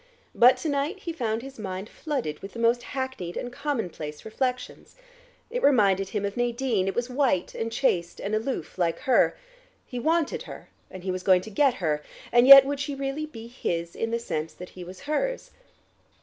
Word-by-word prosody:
But 250 +2 +6
to - - -4
night 295 +7 -1
he 335 - -4
found 230 -6 -2
his 270 -2 -10
mind 190 -1 -5
flooded 255 - -4
with 195 - -9
the - - -9
most 235 +1 +2
hackneyed 260 -9 -5
and 245 - -5
commonplace 180 - -4
reflections. 250 +3 -3 0.6
It - - -2
reminded 195 - +3
him 205 0 -2
of 200 - -3
Nadine; 240 -4 0
it 195 - -2
was 240 0 -1
white 255 -8 0
and 225 0 -3
chaste 175 -10 0
and 200 - -4
aloof 220 -1 -3
like 170 -2 +1
her... 260 -2 +3 0.5
he 250 - -6
wanted 320 +4 +1
her, - - -10 0.2
and 185 -1 -10
he 190 - -1
was 185 0 -3
going 185 -1 +4
to 220 - -10
get 265 +4 +3
her, 155 -7 -1 0.3
and 240 +1 +5
yet 275 0 +12
would 285 0 -2
she 290 0 -3
really 275 +3 -3
be 230 -7 -10
his 170 -8 -3
in 225 - -2
the 230 - 0
sense 160 -8 -4
that 180 - -9
he 180 - -10
was 180 +1 -10
hers? - - -2
235 Hz, 195 wpm, -26 LUFS, 190-275 Hz, 0.6 s, yet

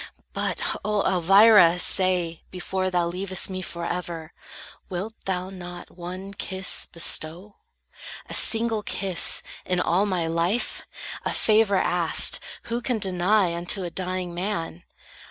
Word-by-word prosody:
But, - - -2 0.2
O 210 -1 0
Elvira, 190 0 +6
say, 180 -3 +3
before 185 +1 -3
Thou 175 -2 +1
leavest 185 +2 -2
me 185 0 -4
forever, 170 -2 -5 0.6
wilt 190 +5 -4
thou 185 0 -3
not 175 -2 -9
One 185 +3 -8
kiss 190 -1 +1
bestow? 170 +4 0 0.7
A - - -8
single 225 -1 +3
kiss, 190 -3 0 0.2
in 180 -1 -1
all 185 +3 +1
My 180 -4 -1
life? 170 +8 -1 0.4
A - - -1
favor 215 -2 +3
asked, 175 -3 +2 0.2
who 235 +1 -3
can 245 -1 -1
deny 190 -1 +2
Unto 175 +3 -1
a 175 - -5
dying 185 -1 -3
man? 175 -2 -4
185 Hz, 125 wpm, -24 LUFS, 175-200 Hz, 0.7 s, Elvira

